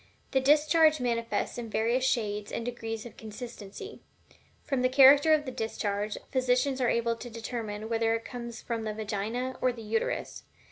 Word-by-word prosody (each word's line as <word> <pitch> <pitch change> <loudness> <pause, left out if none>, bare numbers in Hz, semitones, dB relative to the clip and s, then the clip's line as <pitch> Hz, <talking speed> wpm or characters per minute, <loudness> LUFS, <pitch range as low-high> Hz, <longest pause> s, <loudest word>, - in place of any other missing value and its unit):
The 265 - +2
discharge 305 +2 +5
manifests 235 -1 -1
in 230 -2 -6
various 230 +4 +1
shades 210 -5 0
and 230 - -3
degrees 225 -2 -5
of 240 - -11
consistency. 225 - -9 0.6
From 270 -3 -1
the 255 - +3
character 280 +4 +7
of 305 -1 +4
the 260 - -4
discharge, 210 -3 -2
physicians 260 +1 +1
are 245 - +3
able 235 0 +1
to 240 +1 -8
determine 220 -2 -5
whether 225 0 +1
it 230 - -5
comes 235 -1 -7
from 230 -2 -3
the 215 -1 -4
Vagina 220 +4 -3
or 255 - +3
the 235 -2 -9
Uterus. 220 +1 -2
235 Hz, 170 wpm, -29 LUFS, 220-255 Hz, 0.6 s, character